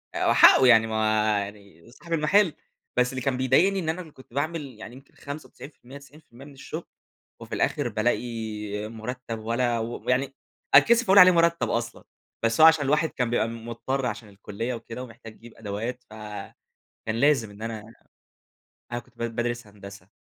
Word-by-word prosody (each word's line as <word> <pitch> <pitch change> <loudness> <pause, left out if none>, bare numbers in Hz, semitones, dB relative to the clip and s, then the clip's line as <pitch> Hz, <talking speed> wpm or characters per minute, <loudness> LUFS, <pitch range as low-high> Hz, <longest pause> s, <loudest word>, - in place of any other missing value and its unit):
آآ، - - -1
هو - - +4
حقه 130 - +7
يعني 115 -2 +6
ما 110 - -5
هو 110 -1 +2
يعني 100 -1 -13
صاحب 170 +7 -8
المحل، 165 +3 +3 0.4
بس 125 0 +2
اللي 130 0 -5
كان 130 0 -1
بيضايقني 160 +10 +3
إن 160 -3 -3
أنا 175 +3 -2
اللي 160 - -12
كنت 130 -4 -18
باعمل 155 +4 -2 0.2
يعني 120 +3 -10
يمكن 135 +1 -17
95% 140 -2 -10
90% 140 -2 -16
من 145 - -14
الشغل، 135 - -8 0.6
وفي - - -6
الآخر - - 0
بالاقي 110 -2 -3
مرتّب 115 +1 -6
ولا 115 +1 -1
و 115 +2 -5
ويعني 130 +2 0 0.4
أتكسف 235 +1 +6
أقول 195 0 +6
عليه 185 0 +9
مرتّب 170 0 +2
أصلًا، 120 0 -3 0.4
بس 115 +6 +2
هو 160 - +10
علشان 160 -3 +4
الواحد 150 +3 +2
كان 125 -3 -2
بيبقى 120 -2 +1
مضطر 115 +4 -4
علشان 110 -2 -5
الكلية 105 +4 -5
وكده 115 +2 -8
ومحتاج 115 -2 -12
يجيب 120 0 -15
أدوات، 115 +4 -5
ف 110 - -17 0.9
كان 110 - -2
لازم 140 -7 +3
إن 100 +2 -13
أنا 110 -2 -5 1.1
أنا 120 - -2
كنت 120 -1 -26
ب - - -5
بادرس 120 -1 -2
هندسة، 100 -2 -13
120 Hz, 175 wpm, -25 LUFS, 110-140 Hz, 1.1 s, هو